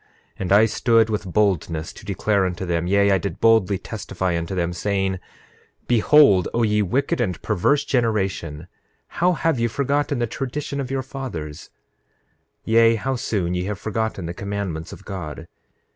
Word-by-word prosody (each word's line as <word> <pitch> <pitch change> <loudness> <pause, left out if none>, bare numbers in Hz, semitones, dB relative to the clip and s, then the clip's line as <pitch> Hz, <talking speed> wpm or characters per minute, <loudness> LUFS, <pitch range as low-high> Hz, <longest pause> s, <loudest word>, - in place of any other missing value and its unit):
And 95 -1 -3
I 105 +3 +7
stood 115 0 +2
with 100 -3 -3
boldness 85 -5 0
to - - -13
declare 100 0 +1
unto 90 +1 -4
them, 85 -1 -1
yea, 100 +1 +3
I 95 - +3
did 100 - -5
boldly 110 -4 +4
testify 95 -3 -3
unto 85 +3 -3
them, 90 -1 -1
saying: 95 +1 -1 0.7
9:8 - - -38
Behold, 120 - +5
O 120 - +2
ye 105 -1 +2
wicked 125 +7 0
and 90 -8 -1
perverse 140 +11 +1
generation, 95 - -1 0.4
how 180 +1 +1
have 165 -5 0
ye 120 - +2
forgotten 140 +3 0
the 120 - +1
tradition 140 +4 -4
of 135 -2 -3
your 135 0 -2
fathers; 85 - -7 0.9
yea, 115 0 +4
how 130 +4 -2
soon 95 -7 -1
ye 90 0 -1
have 105 0 -3
forgotten 110 -3 -3
the 85 - -4
commandments 100 -4 -4
of 100 - -11
God. 90 -7 -6
100 Hz, 165 wpm, -22 LUFS, 90-120 Hz, 0.9 s, I